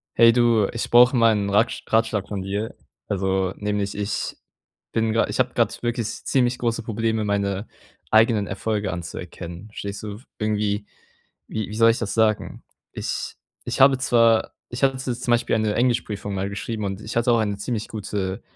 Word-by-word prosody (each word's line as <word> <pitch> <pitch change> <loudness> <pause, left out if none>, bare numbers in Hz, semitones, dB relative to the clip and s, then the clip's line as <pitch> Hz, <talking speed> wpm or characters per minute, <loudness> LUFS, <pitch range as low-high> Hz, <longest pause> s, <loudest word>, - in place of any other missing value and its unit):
Hey 115 0 +7
du, 120 -4 +4
ich 115 - -3
brauche 125 +2 +7
mal 115 -2 +5
'nen 100 -1 -1
Rat 115 +3 +1
Ratschlag 110 -3 +1
von 100 -2 -4
dir. 100 +4 -3 0.3
Also, 95 -1 0
nämlich 105 -1 -2
ich 105 0 -2 0.6
bin 110 -1 +1
gerade 115 - +2
ich - - -4
habe 125 -1 +2
gerade 115 - +2
wirklich 120 0 -1
s - - -7
ziemlich 125 -2 +2
große 115 -1 -1
Probleme, 110 0 -1
meine 100 0 -1 0.4
eigenen 110 -1 +4
Erfolge 105 0 -2
anzuerkennen. 85 +2 -7
Verstehst 100 -1 -6
du? 105 -1 -6 0.2
Irgendwie, 105 -1 -1 0.6
wie 110 -3 -4
wie 105 - -6
soll 115 +1 +6
ich 115 - -3
das 110 -4 -3
sagen? 110 -2 +1 0.3
Ich - - -4 0.3
ich - - -3
habe 135 0 +7
zwar 115 -3 +3 0.2
ich 120 +3 -5
hatte 135 -1 +3
z 130 -1 -3
zum 125 - -1
Beispiel 120 0 +2
eine 110 -1 +1
Englischprüfung 115 -4 0
mal 95 +1 -2
geschrieben 105 +2 -4
und 95 0 -3
ich - - -7
hatte 115 +1 +3
auch 115 - +4
eine 105 -2 -1
ziemlich 110 +1 -3
gute 100 -3 -4
110 Hz, 180 wpm, -23 LUFS, 100-115 Hz, 0.6 s, Hey